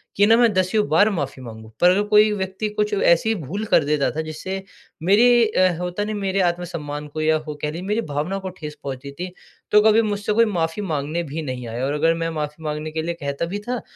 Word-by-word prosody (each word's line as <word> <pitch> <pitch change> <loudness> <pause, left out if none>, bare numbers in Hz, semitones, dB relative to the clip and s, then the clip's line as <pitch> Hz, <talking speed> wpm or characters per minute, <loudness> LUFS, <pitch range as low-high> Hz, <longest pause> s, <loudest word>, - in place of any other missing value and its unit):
कि 200 - +5
ना, 225 +2 +6
मैं 235 -2 +5
दसियों 185 +3 +1
बार 200 +8 +5
माफ़ी 145 -9 -3
माँगूँ। 110 -2 -10
पर 175 - +7
अगर 195 +3 +3
कोई 210 0 +5
व्यक्ति 195 +1 -3
कुछ 210 0 -1
ऐसी 200 +2 +3
भूल 190 +4 -5
कर - - +3
देता 145 -1 +1
था, 160 - -3
जिससे 160 +5 -5 0.4
मेरी 235 +5 +5
अ, 185 -3 +3
होता 180 +3 -2
नहीं, 215 0 -3
मेरे 195 -1 -1
आत्मसम्मान 155 -4 -5
को 155 +1 -5
या 155 0 +3
हो 150 - -4
कह 150 - -1
लीजिए, 170 +3 -6
मेरी 210 +3 +1
भावनाओं 155 +7 -2
को 190 - -4
ठेस 150 -1 -7
पहुँचती 140 0 -6
थी, 175 +6 -6 0.4
तो 210 0 +7
कभी 220 +1 +5
मुझसे 205 -1 -1
कोई 230 +2 +5
माफ़ी 170 -2 -1
माँगने 155 -1 -2
भी 155 +1 -5
नहीं 130 -5 -5
आया 120 +3 -3
और 140 - -1
अगर 160 +3 +2
मैं 165 0 -2
माफ़ी 150 0 -5
माँगने 150 0 -4
के 160 0 -2
लिए 170 +2 -2
कहता 140 +3 -2
भी 195 +4 -4
था, 250 -1 -2
170 Hz, 230 wpm, -22 LUFS, 150-205 Hz, 0.4 s, पर